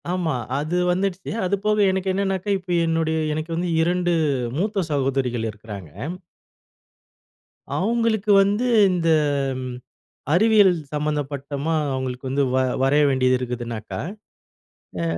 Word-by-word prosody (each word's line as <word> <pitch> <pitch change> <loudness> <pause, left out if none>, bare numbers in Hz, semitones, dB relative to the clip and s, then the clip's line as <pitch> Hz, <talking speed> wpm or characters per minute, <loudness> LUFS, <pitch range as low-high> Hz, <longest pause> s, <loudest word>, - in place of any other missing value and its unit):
ஆமா. 170 -6 -1 0.2
அது 155 +4 -2 0.2
வந்துடுச்சு. 185 0 -2
அதுபோக 205 +3 0
எனக்கு 190 0 -1
என்னான்னாக்கா, 195 0 -1
இப்ப 180 -1 -4
என்னுடைய 165 -1 0 0.2
எனக்கு 155 +2 -4
வந்து 175 +1 -1
2 175 +1 +1 0.4
மூத்த 200 0 0
சகோதரிகள் 130 -4 0
இருக்கிறாங்க. 105 -5 -10 1.9
அவுங்களுக்கு 220 0 +1
வந்து 205 +5 0 0.3
இந்த 175 -2 0 0.5
ம், 125 -1 -5 0.6
அறிவியல் 205 +1 +5 0.2
சம்பந்தப்பட்டதா 145 0 -2 0.2
அவுங்களுக்கு 130 0 -4
வந்து 140 +2 +1
வ - - +3 0.3
வரைய 145 +2 +4
வேண்டியது 130 -1 +2
இருக்குதுன்னாக்க 120 -4 -5 1.1
அ - - 0
160 Hz, 105 wpm, -23 LUFS, 130-190 Hz, 1.9 s, அறிவியல்